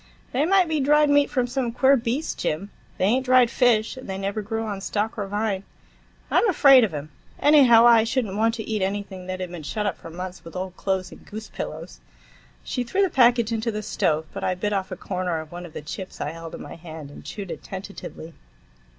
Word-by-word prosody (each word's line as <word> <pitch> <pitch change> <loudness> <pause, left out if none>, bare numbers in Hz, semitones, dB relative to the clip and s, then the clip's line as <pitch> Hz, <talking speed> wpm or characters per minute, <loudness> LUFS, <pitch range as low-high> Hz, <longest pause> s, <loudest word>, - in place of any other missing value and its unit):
"They 275 +4 +1
might 380 -1 +4
be 315 -1 0
dried 295 +1 +4
meat 285 0 +4
from 250 -3 +1
some 245 -1 -2
queer 265 +3 +4
beast, 255 +5 -2
Jim. 180 +7 -2 0.3
They - - +1
ain't 250 +6 +2
dried 250 -2 +5
fish, 235 -3 +2
and 260 - -9
they 190 - -3
never 200 +2 -2
grew 225 +2 -3
on 200 -3 -4
stalk 210 +3 -2
or 205 -3 -3
vine. 205 -1 -1 0.7
I'm 460 - +4
afraid 275 -7 +7
of 215 - +1
'em. 150 0 -6 0.3
Anyhow, 260 -6 +6
I 230 -2 +7
should 240 +2 0
n't 195 -2 -6
want 225 +2 +2
to 220 - -6
eat 215 -2 -1
anything 190 -1 -3
that 185 0 -4
had 180 -2 -5
been 175 -2 -7
shut 210 +8 -3
up 205 - -2
for - - -10
months 180 +2 -7
with 165 - -11
old 185 0 -4
clothes 190 -1 -2
and - - -13
goose 215 +1 -8
pillows." - - -7 0.6
She 250 - -2
threw 380 +12 +1
the 380 - +1
package 240 -3 +4
into 225 +1 -1
the 215 0 -4
stove, 160 -4 0
but 195 - -5
I 185 - 0
bit 205 +3 -2
off 190 -1 -1
a 185 - -5
corner 180 -3 -2
of 155 -1 -9
one 175 0 -7
of 160 - -16
the - - -7
chips 185 +5 -7
I 145 - -2
held 165 0 -8
in - - -8
my - - -9
hand, 160 -3 -9
and - - -12
chewed 200 -4 -7
it - - -6
tentatively. 190 -4 -8
210 Hz, 235 wpm, -24 LUFS, 185-245 Hz, 0.7 s, afraid